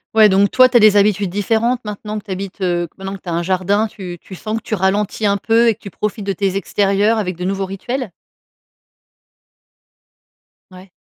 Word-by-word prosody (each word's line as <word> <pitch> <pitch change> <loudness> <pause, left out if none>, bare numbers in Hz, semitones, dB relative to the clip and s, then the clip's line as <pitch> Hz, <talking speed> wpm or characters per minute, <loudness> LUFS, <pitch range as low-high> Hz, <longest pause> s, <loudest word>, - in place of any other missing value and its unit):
Ouais, 215 -1 +7
donc 200 +1 +3
toi 255 0 +6
tu 245 - +4
as - - +6
des 215 -2 +6
habitudes 200 -2 +2
différentes 225 +5 0
maintenant 210 +1 -5
que 210 - -18
tu - - -18
habites, 195 +1 -6
heu 175 -2 0
maintenant 195 0 -5
que - - -27
tu 180 - -7
as - - -2
un 170 - 0
jardin 190 +4 +1
tu 180 -4 -9
tu 190 - -11
sens 215 +4 -4
que - - -5
tu 215 - -3
ralentis 205 +3 0
un 200 0 +2
peu 230 +3 +2
et - - +3
que 215 - -22
tu 200 - -9
profites 210 +2 -4
de 195 0 -1
tes 195 0 -1
extérieurs 200 +3 +1
avec 185 -4 -2
de 180 - -7
nouveaux 195 +1 -1
rituels? 210 +4 -5 2.6
Ouais. 185 +1 -14
200 Hz, 210 wpm, -18 LUFS, 190-215 Hz, 2.6 s, Ouais